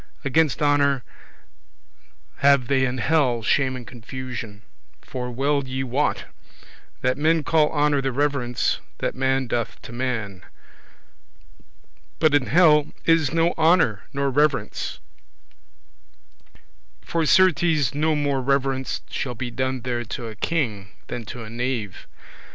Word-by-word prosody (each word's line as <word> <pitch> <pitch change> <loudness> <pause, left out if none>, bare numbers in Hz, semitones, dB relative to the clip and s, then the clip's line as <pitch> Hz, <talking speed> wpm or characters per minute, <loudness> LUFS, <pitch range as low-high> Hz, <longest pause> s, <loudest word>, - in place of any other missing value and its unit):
Against 150 +1 +2
honour 140 -3 +2 1.3
have 140 -2 +4
they 135 -1 +2
in 130 0 -2
hell 125 -4 +1
shame 130 +2 +1
and 125 -2 -8
confusion: 120 -3 -8 0.4
for 125 -1 -5
well 140 +3 0
ye 130 0 -3
wot, 135 +3 -1 0.8
that 130 +1 0
men 160 +1 +2
call 155 -2 +2
honour 145 -2 +2
the 135 0 -1
reverence 135 -3 0 0.2
that - - -2
man 130 0 0
doth 120 -1 -3
to - - -9
man; 120 -7 -3 1.8
but 155 -2 +3
in 145 -3 +3
hell 155 -2 +5 0.2
is 165 -4 +3
no 165 +1 +2
honour 160 - +3
nor 140 0 -1
reverence; 150 +3 0 2.1
for 165 -1 -1
certes 165 -7 +3
no 155 +2 +1
more 140 -2 0
reverence 135 0 0
shall 125 -3 -4
be 120 +1 -5
done 130 +1 -2
there 120 -1 -2
to 120 +2 -6
a 110 -1 -7
king 110 -8 -2 0.2
than 120 -2 -5
to 120 +2 -7
a 110 - -9
knave 120 -5 -4
[servant]. - - -35
135 Hz, 130 wpm, -23 LUFS, 125-150 Hz, 2.1 s, hell